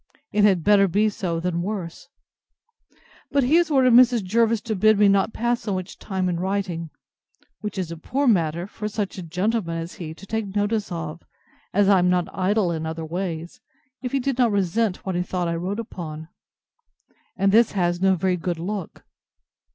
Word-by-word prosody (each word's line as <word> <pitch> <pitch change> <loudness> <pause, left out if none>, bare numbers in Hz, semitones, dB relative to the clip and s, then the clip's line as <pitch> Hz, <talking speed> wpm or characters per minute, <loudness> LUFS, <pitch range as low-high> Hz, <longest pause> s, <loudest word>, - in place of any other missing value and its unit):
It 210 - +2
had 190 -5 +4
better 200 0 +5
be 205 +4 +2
so 175 -5 -3
than 170 0 -1
worse! 185 -3 -5 1.2
But 280 -1 +2
he 255 +5 +1
has 345 -2 +2
ordered 260 -4 +4
Mrs. 245 -2 +6
Jervis 225 +3 +2
to 220 -2 -3
bid 215 +2 +4
me 205 0 +5
not 200 +2 +3
pass 240 +1 -1
so 205 -3 -2
much 185 0 -6
time 190 -2 -2
in 175 -2 -1
writing; 185 -3 -2 0.7
which 210 -2 -5
is 180 -3 -3
a 165 - -6
poor 270 - -1
matter 170 -5 +2
for 210 +2 -6
such 205 -2 -4
a - - -4
gentleman 180 +1 -1
as 165 +1 -5
he 160 -1 -6
to 195 - -13
take 210 -1 -4
notice 205 0 0
of, 165 -1 -5 0.5
as 200 0 +3
I 195 -2 +5
am 180 0 +3
not 180 -1 0
idle 190 0 +1
other 160 0 -4
ways, 170 0 -5 0.4
if 250 -2 -4
he 275 - +1
did 260 0 -2
not 240 -3 +4
resent 200 +1 0
what 190 - -2
he 175 - 0
thought 180 -1 -2
I 170 - -1
wrote 185 +6 -3
upon. 160 -8 -7 1.1
And 195 0 +3
this 225 +2 +4
has 175 -2 0
no 190 0 +4
very 180 +1 0
good 175 0 -3
look. 190 +1 -5
190 Hz, 190 wpm, -23 LUFS, 175-215 Hz, 1.2 s, Mrs